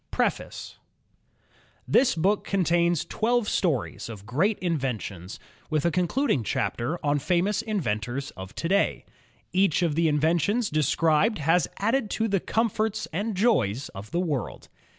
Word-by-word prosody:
PREFACE - - -2 1.1
Tms 250 -9 +3
book 195 +5 +2
contains 175 -3 +1
twelve 235 0 0
stories 150 - -1
of 105 -3 -9
great 175 - +1
inventions, 125 - -3 0.3
with 155 -1 0
a 170 - +3
concluding 180 - +1
chapter 120 +8 -1
on 145 0 +2
famous 185 +7 +1
inventors 135 - -2
of 95 +1 -10
to 165 - -2
day. 200 +3 +1 0.5
Each 185 -2 +3
of 165 -3 +1
the 165 +2 +2
inventions 170 +9 +1
described 155 - +2
has 160 +2 +2
added 225 +2 0
to 225 - +1
the 200 -2 +1
com 225 +6 +1
forts 215 0 -2
and 205 +5 -2
joys 135 - +1
of 100 +2 -9
the 170 - -1
world. 150 - -3
170 Hz, 140 wpm, -26 LUFS, 140-205 Hz, 1.1 s, Tms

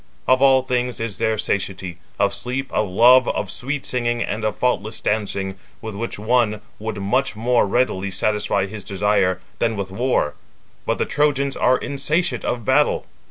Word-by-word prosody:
Of 130 +1 +4
all 135 -1 +5
things 125 -1 -1
is 115 -3 -4
there 110 0 +1
satiety,—of 95 -1 -2
sleep, 130 +3 -3
of 105 -2 0
love, 125 +6 +6
of 95 - -2
sweet 140 +6 -4
singing, 120 -1 0
and 110 +2 -4
of 110 -1 0
faultless 110 -3 -1
dancing, 100 -2 -2 0.2
with 110 -1 -6
which 115 +4 -4
one 110 -1 +1 0.2
would 110 0 -4
much 115 +6 0
more 120 0 +2
readily 100 -4 0
satisfy 100 0 0
his 100 0 -7
desire, 100 -1 +1 0.2
than 115 -1 +1
with 100 -2 -4
war; 115 - 0 0.5
but - - +1
the - - 0
Trojans 140 -2 +1
are 130 0 +3
insatiate 140 -1 -1
of 120 -3 -2
battle." - - +2
110 Hz, 160 wpm, -21 LUFS, 100-125 Hz, 0.5 s, love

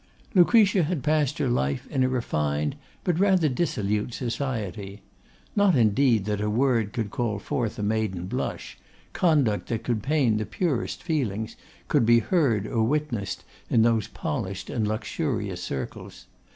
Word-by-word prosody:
Lucretia 195 0 +5
had 160 -4 -1
passed 150 -2 +1
her 140 - 0
life 70 - 0
in 130 - +2
a 130 - +2
refined, 75 - -1 0.3
but 175 -2 0
rather 190 -5 +4
dissolute 115 - -1
society. 110 -6 -4 0.5
Not 205 -4 +4
indeed 115 -1 +3
that 105 -1 -1
a 105 - 0
word 115 -1 +2
that 105 - -15
could 110 -4 -3
call 115 -4 -1
forth 120 +1 -2
a 105 - -3
maiden 105 -4 -1
blush, 95 - -4 0.3
conduct 145 - +2
that 115 -2 -2
could 115 -3 -1
pain 135 -5 +2
the 110 - -2
purest 160 -10 -2
feelings, 115 - -2 0.3
could - - +3
be 120 0 +7
heard 115 - +2
or 110 0 0
witnessed 120 -6 -1 0.3
in 115 - +4
those 115 -2 +2
polished 100 -6 -4
and 110 -3 0
luxurious 110 - -2
circles. 65 -4 -6
115 Hz, 150 wpm, -26 LUFS, 105-145 Hz, 0.5 s, be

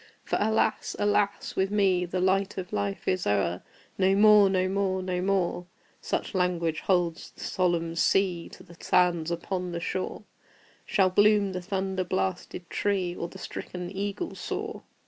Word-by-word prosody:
For, - - -1
alas! 220 +1 +1
alas! 205 -1 0
with 190 0 +1
me 195 -3 +2
The 180 +1 -3
light 190 +2 +1
of 180 -1 -5
Life 100 -1 -2
is 185 -1 0
o'er! 95 -4 +1 0.4
"No 190 0 +4
more 210 -1 +7
no 185 -1 +1
more 190 -1 0
no 180 -1 -2
more" 185 -2 0 0.3
(Such - - -2
language 175 -4 0
holds 175 -2 0
the - - -16
solemn 170 -2 0
sea 180 0 +1
To - - -12
the 170 -2 -15
sands 175 -3 +2
upon 180 +1 -3
the 170 - -2
shore) 185 +2 -3 0.6
Shall 190 -2 +3
bloom 205 0 +4
the 185 -1 -4
thunder 190 0 -2
blasted 95 - -3
tree, 185 -3 -1
Or 170 - -4
the - - -12
stricken 180 0 -6
eagle 205 - -3
soar! - - -5
185 Hz, 160 wpm, -27 LUFS, 175-195 Hz, 0.6 s, more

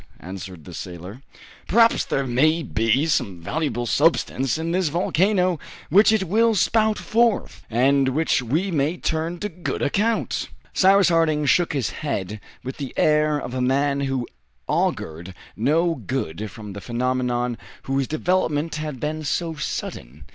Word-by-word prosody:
answered 90 -2 -8
the 90 - -10
sailor. 90 +8 -8 0.5
"Perhaps 230 +3 +4
there 135 - -1
may 155 +7 +2
be 115 +3 +1
some 100 - 0
valuable 120 - -2
substance 135 -1 +1
in 165 +1 -2
this 180 0 +1
volcano, 180 +2 +1 0.3
which 205 +5 +6
it 220 -3 +2
will 220 +5 +2
spout 220 +3 +2
forth, 230 -1 +1
and 135 +3 +3
which 155 +1 +1
we 155 - -1
may 155 +2 0
turn 165 +1 -2
to 205 - -3
good 175 -3 -4
account!" 220 +9 0 0.2
Cyrus 195 0 +5
Harding 160 -3 +2
shook 175 +3 +3
his 135 -5 -1
head 105 - -4 0.2
with 130 +1 -6
the 140 -3 -6
air 150 0 +3
of 125 - -6
a 130 - -2
man 140 +2 +1
who 135 -3 -2 0.4
augured 85 +4 -2 0.2
no 160 +9 +2
good 110 - -4
from 105 -1 -9
the 100 - -8
phenomenon 125 0 -1 0.3
whose 135 -1 -1
development 155 -1 0
had 150 -4 -5
been 155 +2 -3
so 165 +3 -1
sudden. 75 - -5
145 Hz, 145 wpm, -23 LUFS, 120-170 Hz, 0.5 s, which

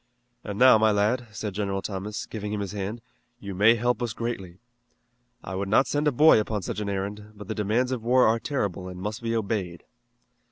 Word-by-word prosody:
"And 105 -2 -5
now, 125 -2 +7
my 110 0 +4
lad," 110 +4 +1
said 105 -2 -5
General 100 -1 -2
Thomas, 105 +1 -4
giving 105 -2 -6
him 105 - -2
his 100 -2 -4
hand, 105 +3 -4 0.4
"you 100 -3 -6
may 105 +5 +5
help 120 +2 0
us 120 -2 -2
greatly. 95 -7 -5 0.9
I - - -6
would 95 +1 -3
not 115 +6 +4
send 145 +1 0
a - - +4
boy 150 -1 +6
upon 105 -2 -2
such 100 - -4
an 105 -1 -3
errand, 100 +2 -4
but 105 -1 -10
the 110 - -2
demands 110 +5 0
of 125 -3 -2
war 125 +3 +4
are 115 +1 +3
terrible 100 - -3
and 90 -1 -8
must 105 +4 -4
be 115 0 -1
obeyed." 100 -6 -2
105 Hz, 210 wpm, -26 LUFS, 100-115 Hz, 0.9 s, now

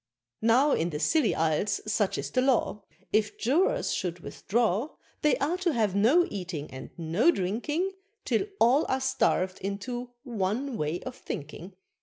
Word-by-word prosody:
Now, 245 +6 +4
in 170 -7 +1
the 150 -3 -4
Silly 290 - +2
Isles 160 +5 +1
such 210 -2 0
is - - -4
the 255 - +2
law, 255 -5 +1 0.3
If 215 0 +1
Jurors 290 +11 +1
should 180 -1 -3
withdraw, 225 - -1 0.3
They 295 -4 +3
are 295 +6 0
to 365 -3 0
have 215 -6 +1
no 260 - +5
eating 180 -7 -5
and 130 0 -8
no 170 - +2
drinking, 295 - 0 0.3
Till 245 - +1
all 260 +7 +4
are 260 - +1
starved 225 -8 +1
into 240 +6 -4
one 235 +2 -2
way 155 -1 -2
of 255 -1 -6
thinking. 165 - -7
225 Hz, 155 wpm, -28 LUFS, 185-265 Hz, 0.3 s, no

